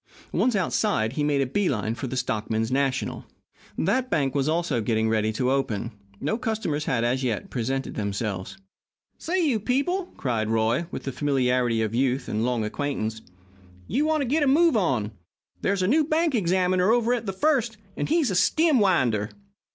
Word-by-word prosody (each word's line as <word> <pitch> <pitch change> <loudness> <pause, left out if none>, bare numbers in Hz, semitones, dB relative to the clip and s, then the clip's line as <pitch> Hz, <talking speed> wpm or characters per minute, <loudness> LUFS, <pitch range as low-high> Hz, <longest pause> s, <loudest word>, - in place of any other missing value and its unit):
Once 250 -3 +1
outside, 185 - 0
he 150 - -1
made 145 -1 +2
a - - +2
bee 185 +9 0
line 110 -3 -1
for 130 +3 -5
the 130 - -4
Stockmen's 110 -2 -1
National. 135 0 -1 0.5
That 250 +8 +1
bank 135 - +1
was 140 +1 +1
also 165 -7 0
getting 110 0 +1
ready 110 -1 +1
to 125 +4 0
open. 115 -4 -1 0.3
No 155 - -1
customers 215 -11 -2
had, 120 -3 0
as 125 +3 0
yet, 115 -5 -2
presented 135 +2 -2
themselves. 100 - -3 0.6
"Say, 355 +1 0
you 240 -6 +1
people!" 315 - 0
cried 115 -5 -1
Roy, 115 +9 +1
with - - -6
the 135 - -3
familiarity 125 -5 +1
of 110 0 -2
youth 130 +1 0
and 110 +1 -1
long 120 -3 0
acquaintance, 110 -3 -3 0.7
"you 270 +7 +1
want 315 -1 +1
to - - 0
get 300 +6 +1
a 290 - +3
move 320 +2 +4
on 135 - +1
you. 105 - -6 0.5
There's 195 -1 0
a - - +2
new 305 +8 +4
bank 315 +1 +1
examiner 185 -2 +2
over 240 0 +2
at 230 -3 -2
the - - 0
First, 235 0 +1 0.2
and - - -3
he's 310 -7 +2
a - - -1
stem 310 - +3
winder. 125 - +2
140 Hz, 185 wpm, -25 LUFS, -, 0.7 s, move